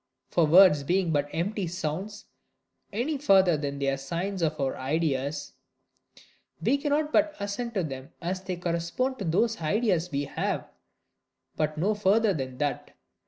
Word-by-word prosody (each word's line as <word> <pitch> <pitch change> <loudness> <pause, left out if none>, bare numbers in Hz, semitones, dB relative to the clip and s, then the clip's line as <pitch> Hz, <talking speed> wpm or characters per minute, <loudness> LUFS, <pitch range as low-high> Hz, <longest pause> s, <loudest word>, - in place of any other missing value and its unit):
For 170 -3 +3
words 170 -2 +7
being 175 +4 +1
but 145 -1 0
empty 190 +3 -2
sounds, 185 +5 -4 0.7
any 265 +8 -1
further 190 - +5
than 140 -1 -3
they 140 0 -1
are 135 - 0
signs 175 +8 -3
of 160 -2 0
our 135 -1 0
ideas, 145 0 -2 1.1
we 280 - +2
cannot 300 +1 0
but 310 0 +3
assent 205 +4 -4
to 190 - +1
them 135 -3 -6
as 185 +2 -3
they 185 -1 -4
correspond 175 +10 -2
to 200 - -3
those 195 +5 +1
ideas 180 0 +1
we 140 -2 -1
have, 140 - -2 0.9
but 155 0 -1
no 195 +7 +2
further 210 +1 +3
than 130 -5 -5
that. 145 0 -3
175 Hz, 155 wpm, -27 LUFS, 150-205 Hz, 1.1 s, words